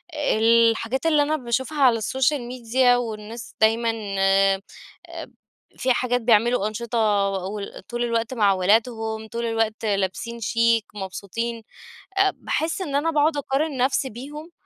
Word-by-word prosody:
الحاجات 230 0 +2
اللي 300 -3 +4
أنا 310 +1 0
باشوفها 260 +3 -2
على 240 -3 +5
السوشيال 265 +5 0
ميديا 245 +1 +2
والناس 225 -1 -6
دايمًا 225 +1 +3 0.3
آآ، 195 0 +3 1.2
في 255 -1 +2
حاجات، 245 0 0
بيعملوا 230 -1 +3
أنشطة 230 +2 -3 0.3
و 195 +2 -4
وطول 240 +4 -6
الوقت 230 +1 -1
مع 205 -5 +3
ولادهم، 220 +3 0
طول 235 +1 -4
الوقت 225 -1 -1
لابسين 205 +4 -2
شيك، 230 0 +2
مبسوطين. 220 +4 -5 0.5
آآ، 390 -1 +4
باحس 325 +4 -2
إن 285 -6 -3
أنا 325 +3 +1
باقعد 300 0 +2
أقارن 280 +1 -1
نفسي 265 +1 +1
بيهم، 295 +8 -9
235 Hz, 130 wpm, -23 LUFS, 220-260 Hz, 1.2 s, على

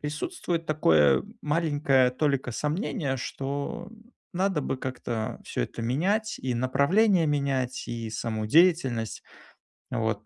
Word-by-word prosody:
присутствует 165 - -3
такое 75 - +4 0.2
маленькая 145 -4 +2
толика 140 -1 0
сомнения, 150 - -2
что 140 +5 -4 0.4
надо 185 -3 0
бы 135 - -2
как-то 120 -4 -4
всё - - -2
это 115 - -5
менять: 190 - 0
и 125 -2 -2
направление 160 - +3
менять, 135 -3 -1
и 115 -1 -4
саму 110 0 -3
деятельность, 135 -6 +3 0.7
вот. 110 -3 -1
140 Hz, 110 wpm, -27 LUFS, 120-160 Hz, 0.7 s, такое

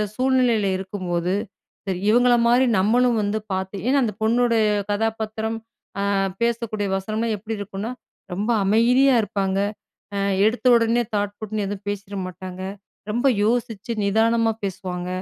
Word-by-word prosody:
சூழ்நிலையில 250 -5 +2
இருக்கும்போது, 185 -2 -2 0.5
சரி, 185 -2 -1
இவங்களமாரி 240 +1 +4
நம்மளும் 240 +4 +3
வந்து 205 +1 0
பாத்து 190 +1 -3
ஏன்னா 275 +2 +4
அந்த 215 -3 -1
பொண்ணுடைய 230 0 +3 0.3
கதாபாத்திரம், 220 +1 -2 0.5
அ - - +1 0.3
பேசக்கூடிய 230 -3 -1
வசனம்லாம் 215 +3 -2
எப்பிடி 220 +2 -5
இருக்குன்னா, 200 +3 -5 0.4
ரொம்ப 210 +5 -1
அமைதியா 245 +6 +4
இருப்பாங்க. 195 -2 -1 0.6
அ - - 0 0.3
எடுத்த 245 +3 -1
உடனே 230 +1 +2
தாட் 205 0 -1
பூட்ன்னு 215 -1 -3
எதுவும் 200 0 -6
பேசிற 200 0 -5
மாட்டாங்க. 185 +1 -8 0.5
ரொம்ப 240 +5 0 0.2
யோசிச்சு 230 -1 -1
நிதானமா 225 +2 +2
பேசுவாங்க. 180 -2 -4
220 Hz, 120 wpm, -23 LUFS, 200-235 Hz, 0.6 s, இவங்களமாரி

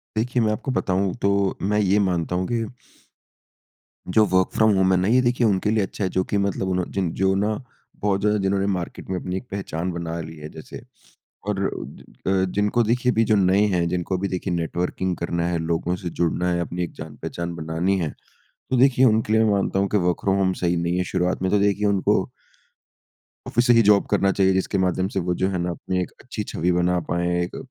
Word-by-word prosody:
देखिए, 120 +3 0
मैं 110 - +2
आपको 120 +5 -3
बताऊँ 95 -5 0
तो 100 -1 +1
मैं 105 +2 +1
ये 100 0 +3
मानता 85 -1 -1
हूँ 90 0 -1
कि 115 -1 -1 1.5
जो 110 -1 +6
वर्क 95 0 +3
फ्रॉम 110 -1 +4
होम 95 0 +3
है - - +4
ना 95 - +1
ये 125 +4 +4
देखिए 120 -1 +2
उनके 100 0 +1
लिए 110 -2 +2
अच्छा 95 - -4
है 95 - +1
जो 95 +1 0
कि 100 - -2
मतलब 100 -1 -1
उन 90 -1 0
जिन 95 -4 -1
जो 95 0 +3
ना, 105 +2 0 0.4
बहुत 100 -1 +1
ज़्यादा 105 0 +2
जिन्होंने 95 0 +1
मार्केट 90 -2 -6
में 95 - -1
अपनी 90 0 -4
एक - - -6
पहचान 90 -3 -3
बना 85 -1 -4
ली 80 0 -8
है। 75 0 -8
जैसे - - -10 0.7
और 105 -2 -1 0.7
अ, - - +3 0.2
जिनको 105 +4 +2
देखिए 125 +3 +1
अभी 115 -1 +2
जो - - +6
नए 100 +1 +4
हैं, 85 -1 +1
जिनको 90 +1 -1
अभी 100 +2 -2
देखिए 95 0 -3
नेटवर्किंग 90 +2 -2
करना 85 0 -1
है, 85 -1 0
लोगों 85 +2 -1
से 90 -1 -5
जुड़ना 85 +1 +1
है, 85 - 0
अपनी 85 +1 -3
एक 85 - -5
जान - - -8
पहचान 85 0 -4
बनानी 85 +4 -1
है। 80 -4 -1 0.6
तो 130 - +1
देखिए 130 0 +5
उनके 110 -2 +2
लिए 110 0 +4
मैं 110 - +3
मानता 100 -1 +1
हूँ 100 - +2
कि 105 - +3
वर्क 90 -2 0
फ्रॉम 95 0 +2
होम 95 -1 +2
सही 90 0 +2
नहीं 85 +1 0
है, 90 - +1
शुरुआत 90 0 -1
में 95 0 0
तो 105 - +3
देखिए 100 +1 +2
उनको 100 -2 +1 1.2
ऑफ़िस 120 +2 +1
से 120 - +7
ही 115 - +6
जॉब 105 -1 +5
करना 100 - +3
चाहिए। 95 -1 +3
जिसके 95 +1 0
माध्यम 95 0 +1
से 95 - -2
वो 90 0 -1
जो 95 - +3
है 95 - -2
ना 90 +1 -1
अपनी 90 +2 -3
एक 90 - -5
अच्छी - - -5
छवि 90 +3 -1
बना 90 0 +2
पाएँ, 85 0 0
एक 90 - -6
95 Hz, 225 wpm, -23 LUFS, 90-105 Hz, 1.5 s, से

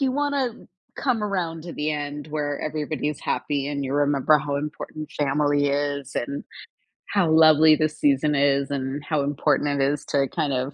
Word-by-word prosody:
you 270 -2 +2
wanna 285 -2 0 0.5
come 245 -6 0
around 175 -6 -2
to 170 - -7
the 150 +1 -2
end 145 0 -4
where 145 -1 -2
everybody's 150 -1 -3
happy, 140 -1 -2
and 140 -1 -3
you 135 - -3
remember 145 +1 +3
how 145 -1 -3
important 150 +1 -6
family 145 0 +1
is, 140 -1 -2
and 140 +4 -3 0.7
how 195 -5 +1
lovely 155 -1 +6
the 155 +1 +1
season 150 0 +1
is, 140 0 +2
and 140 +1 -3
how 155 -3 0
important 145 0 0
it - - +4
is 150 0 -4
to, 140 -1 +2
kind 155 -6 -1
of, 130 +2 -2
145 Hz, 175 wpm, -24 LUFS, 140-155 Hz, 0.7 s, lovely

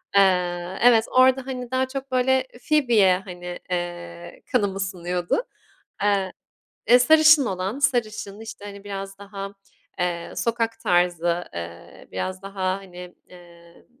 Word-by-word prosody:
Eee, 180 -1 +2
evet 230 -2 +6
orada 260 0 +4
hani 250 -2 -5
daha 260 0 +1
çok 270 0 -6
böyle 260 +1 +2 0.2
Phoebe'ye 230 -11 +4
hani, 180 -1 -7
eee, 85 - -5
kanım 205 -6 +1
ısınıyordu. 180 - -2 0.6
Iıı, 195 -2 +2 0.6
eee, 245 +1 +8
sarışın 310 +1 +6
olan, 190 +6 -3
sarışın 215 -6 -1
işte 215 -2 -9
hani 200 0 -9
biraz 195 -1 -6
daha, 200 0 -7 0.5
eee, 175 -1 -2
sokak 230 -1 -1
tarzı, 175 -2 +1
eee, 85 0 -9
biraz 185 - -4
daha 195 -1 -8 0.2
hani, 180 -2 -11 0.2
ııı, 170 -1 -17
195 Hz, 125 wpm, -24 LUFS, 175-240 Hz, 0.6 s, eee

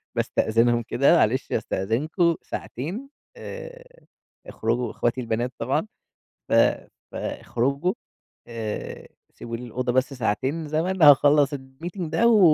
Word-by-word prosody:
باستأذنهم 120 +2 +2
كده 140 +7 +3
معلش 130 -2 +1
أستأذنكم 155 - 0
ساعتين 185 - -6 0.3
آآ، - - -10 0.4
اخرجوا 120 +2 -1
إخواتي 120 +2 -1
البنات 120 +1 -2
طبعًا، 135 - 0 0.6
ف - - 0 0.6
فاخرجوا 140 +9 -1 0.5
آآ، 115 -3 -5 0.3
سيبوا 115 0 -6
لي 120 - -9
الأوضة 125 +1 -2
بس 130 +2 +1
ساعتين 130 +6 -1
زمن 170 +5 -1
هاخلّص 145 0 +6
الmeeting 140 +8 -8
ده 175 +8 +2
و 225 -2 +6
135 Hz, 110 wpm, -24 LUFS, 120-170 Hz, 0.6 s, هاخلّص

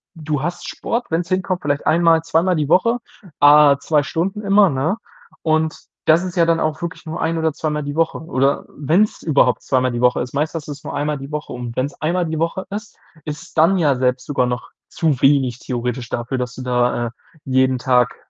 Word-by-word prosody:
du 150 -3 -3
hast 175 +1 -4
Sport, 235 +1 -3
wenn's 170 +1 -1
hinkommt, 185 0 -1
vielleicht 145 0 -1
einmal, 165 0 +4
zweimal 170 +2 +2
die 150 -2 -1
Woche, 230 +8 +3 0.4
á 145 -1 +7
2 150 -1 +1
Stunden 185 - -2
immer, 200 0 +5
ne, 155 +8 -1 0.4
und 160 -1 +1 0.3
das 160 +3 +4
ist 180 -1 -5
ja 170 - +5
dann 165 0 +2
auch 155 +1 -1
wirklich 170 0 -6
nur 160 +2 -5
ein 165 0 0
oder 160 0 +1
zweimal 150 -2 -2
die 145 +1 -5
Woche 165 0 0
oder 140 -3 0
wenn's 170 +9 +1
überhaupt 150 -4 +2
zweimal 130 -1 +1
die 120 - -3
Woche 125 0 +3
ist, 125 +1 -5
meistens 155 +3 -1
hast - - -16
du's 145 -1 -8
nur - - -5
einmal 145 0 -1
die 135 +2 -9
Woche 150 0 -5
und 120 -1 -6
wenn's 135 +3 -2
einmal 175 +3 0
die 160 -1 -3
Woche 170 +3 -2
ist, 210 +2 -7 0.3
ist 150 +1 -5
es - - -17
dann 165 +5 +4
ja 150 -5 +3
selbst 125 0 0
sogar 140 -4 0
noch 125 0 -4 0.2
zu 150 -6 0
wenig 135 -3 +3
theoretisch 125 -1 -3
dafür, 120 +2 -3
dass 125 0 -4
du 130 - -7
da, 125 -1 +1
äh, - - -4 0.4
jeden 130 -1 +2
Tag 125 0 +2
150 Hz, 215 wpm, -20 LUFS, 130-165 Hz, 0.4 s, á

